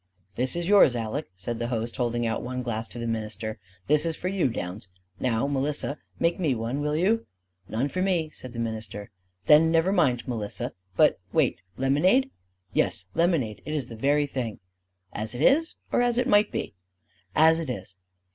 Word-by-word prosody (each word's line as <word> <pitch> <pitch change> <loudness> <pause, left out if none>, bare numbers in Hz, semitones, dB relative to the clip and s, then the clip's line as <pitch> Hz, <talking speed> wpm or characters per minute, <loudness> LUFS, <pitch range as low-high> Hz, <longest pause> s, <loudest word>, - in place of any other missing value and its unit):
"This 130 +7 -1
is 170 0 -2
yours, 195 -11 +6
Aleck," 115 +6 -3
said 115 +5 -4
the 120 - -1
host, 115 -1 -3
holding 120 -1 0
out 115 -1 -1
one 125 +1 -4
glass 110 -2 -3
to - - -11
the 120 - -3
minister. 110 -1 -3 0.3
"This 150 +1 +3
is 165 -1 -1
for 180 - -2
you, 190 -8 +1
Downs. 95 -2 -5 0.3
Now, 120 -1 +1
Melissa, 140 +1 -1 0.2
make 170 +2 +1
me 155 -8 +1
one, 120 +5 -2
will 150 0 0
you?" 210 +8 +2 0.4
"None 120 +6 0
for 185 +6 -3
me," 175 -5 +1
said 130 -4 -10
the - - -8
minister. 110 -3 -4 0.3
"Then 155 +2 +7
never 165 +3 +3
mind, 135 - +2
Melissa. 110 -5 -3 0.2
But - - +5
wait - - +2 0.2
lemonade?" 180 - +3 0.4
"Yes; - - +1
lemonade. 160 - +1
It 155 - -4
is 140 -5 -3
the 115 - -7
very 145 +5 +2
thing." 125 -6 -4 0.5
"As 110 +3 -3
it 125 - -4
is 320 - +4 0.2
or - - +3
as 240 -1 +2
it 250 - +2
might 205 +1 +4
be?" - - -3 0.6
"As 160 +1 +6
it 160 -4 -4
is." 105 -6 -6
135 Hz, 185 wpm, -26 LUFS, 115-165 Hz, 0.6 s, Then